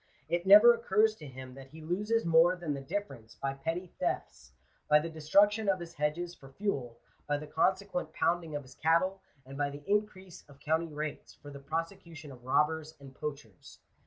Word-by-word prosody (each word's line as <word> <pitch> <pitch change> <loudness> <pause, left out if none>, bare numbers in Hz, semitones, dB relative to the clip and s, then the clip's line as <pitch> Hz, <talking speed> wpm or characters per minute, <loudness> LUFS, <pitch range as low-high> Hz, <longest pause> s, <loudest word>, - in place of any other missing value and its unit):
It 175 +3 -1
never 210 +5 +10
occurs 220 -1 +2
to 150 - -10
him 130 -1 -10
that 135 0 -11
he 155 +4 -13
loses 210 +8 -1
more 170 +2 +5
than 170 -5 -3
the 140 - -5
difference 135 - -6
by 135 0 -3
petty 165 +6 -4
thefts, 65 +1 -3 0.4
by 150 - +7
the 165 +2 -2
destruction 200 +7 +3
of 190 -1 +2
his 170 -1 -8
hedges 165 +4 -2
for 135 -5 -15
fuel, 135 - -3 0.3
by 145 0 +1
the 150 - -7
consequent 180 +1 0
pounding 165 -2 0
of 145 - -4
his 130 0 -15
cattle, 175 +6 +1 0.2
and 135 +2 -9
by 145 -1 +1
the 145 +1 -10
increase 195 -3 -2
of 140 -1 -17
county 160 +2 -1
rates, 150 0 -6
for 145 - -12
the 140 - -9
prosecution 165 0 -5
of 125 -2 -13
robbers 155 +4 0
and 135 -1 -13
poachers. 140 -11 -8
160 Hz, 190 wpm, -31 LUFS, 140-185 Hz, 0.4 s, never